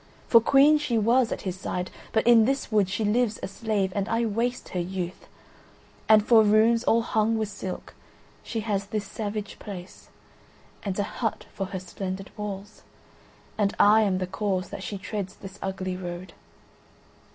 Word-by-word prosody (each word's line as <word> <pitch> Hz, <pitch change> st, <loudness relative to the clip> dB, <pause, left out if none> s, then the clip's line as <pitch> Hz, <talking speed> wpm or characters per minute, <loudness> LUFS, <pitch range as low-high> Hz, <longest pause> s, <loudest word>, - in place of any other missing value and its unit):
For 230 Hz, -, +7 dB
Queen 280 Hz, +5 st, +5 dB
she 245 Hz, -6 st, 0 dB
was 235 Hz, +3 st, +3 dB
at -, -, -4 dB
his 185 Hz, -1 st, -4 dB
side, 180 Hz, 0 st, -3 dB, 0.2 s
but 220 Hz, -, +1 dB
in 230 Hz, -2 st, +7 dB
this 270 Hz, 0 st, -1 dB
wood 205 Hz, -3 st, +3 dB
she 205 Hz, +2 st, -1 dB
lives 220 Hz, 0 st, +1 dB
a -, -, -1 dB
slave, 200 Hz, -2 st, -1 dB
and 200 Hz, 0 st, -1 dB
I 230 Hz, +1 st, +1 dB
waste 235 Hz, +3 st, -2 dB
her 180 Hz, -, -3 dB
youth; 180 Hz, 0 st, -4 dB, 0.8 s
and 215 Hz, -1 st, +6 dB
for 230 Hz, -1 st, +7 dB
rooms 220 Hz, +2 st, +4 dB
all 230 Hz, -1 st, +3 dB
hung 225 Hz, 0 st, +1 dB
with 215 Hz, -2 st, -1 dB
silk 195 Hz, -2 st, -7 dB, 0.5 s
she 225 Hz, -, -4 dB
has 200 Hz, -2 st, -2 dB
this 210 Hz, -1 st, -3 dB
savage 210 Hz, 0 st, -5 dB
place, 185 Hz, -3 st, -9 dB, 0.7 s
and 195 Hz, -3 st, -3 dB
a 205 Hz, -, +1 dB
hut 215 Hz, 0 st, -3 dB
for 195 Hz, -, -3 dB
her 190 Hz, 0 st, -5 dB
splendid 190 Hz, +1 st, -6 dB
walls, 205 Hz, 0 st, -6 dB, 0.8 s
and 200 Hz, -1 st, +1 dB
I 215 Hz, +2 st, +6 dB
am 195 Hz, -3 st, +2 dB
the 185 Hz, -, -1 dB
cause 190 Hz, 0 st, -2 dB
that -, -, -6 dB
she 200 Hz, +1 st, -4 dB
treads 200 Hz, -1 st, -5 dB
this 195 Hz, +1 st, -11 dB
ugly 190 Hz, -1 st, -3 dB
road. 175 Hz, -1 st, -7 dB
205 Hz, 175 wpm, -26 LUFS, 190-225 Hz, 0.8 s, For